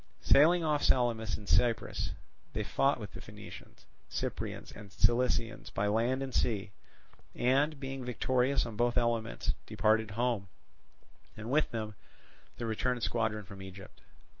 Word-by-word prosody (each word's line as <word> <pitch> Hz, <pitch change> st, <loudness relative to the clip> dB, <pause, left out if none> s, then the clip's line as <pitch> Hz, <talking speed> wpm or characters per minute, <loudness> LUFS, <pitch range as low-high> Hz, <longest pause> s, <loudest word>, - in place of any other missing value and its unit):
Sailing 165 Hz, +5 st, +6 dB
off 150 Hz, -2 st, +1 dB
Salamis 115 Hz, -3 st, +2 dB
in 105 Hz, -, -11 dB
Cyprus, 115 Hz, +7 st, +1 dB, 0.4 s
they -, -, -1 dB
fought -, -, +2 dB
with -, -, -7 dB
the -, -, -9 dB
Phoenicians, -, -, -12 dB, 0.2 s
Cyprians, -, -, -4 dB
and 100 Hz, -2 st, -11 dB
Cilicians 120 Hz, -2 st, +1 dB
by 100 Hz, -, 0 dB
land 115 Hz, +6 st, +1 dB
and 130 Hz, -2 st, -5 dB
sea, 105 Hz, -4 st, 0 dB, 0.6 s
and, 140 Hz, +4 st, +2 dB
being 135 Hz, -1 st, -5 dB
victorious 125 Hz, +2 st, +1 dB
on 115 Hz, -2 st, -6 dB
both 120 Hz, +2 st, +1 dB
elements 115 Hz, -1 st, 0 dB
departed 110 Hz, 0 st, +2 dB
home, 115 Hz, -2 st, 0 dB, 0.9 s
and 110 Hz, +3 st, -5 dB
with 155 Hz, +2 st, +3 dB
them 110 Hz, -2 st, -4 dB, 0.6 s
the 120 Hz, -, -3 dB
returned 120 Hz, +2 st, -1 dB
squadron 110 Hz, -3 st, 0 dB
from 100 Hz, -1 st, -10 dB
Egypt. 95 Hz, 0 st, -11 dB
115 Hz, 140 wpm, -32 LUFS, 110-130 Hz, 0.9 s, Sailing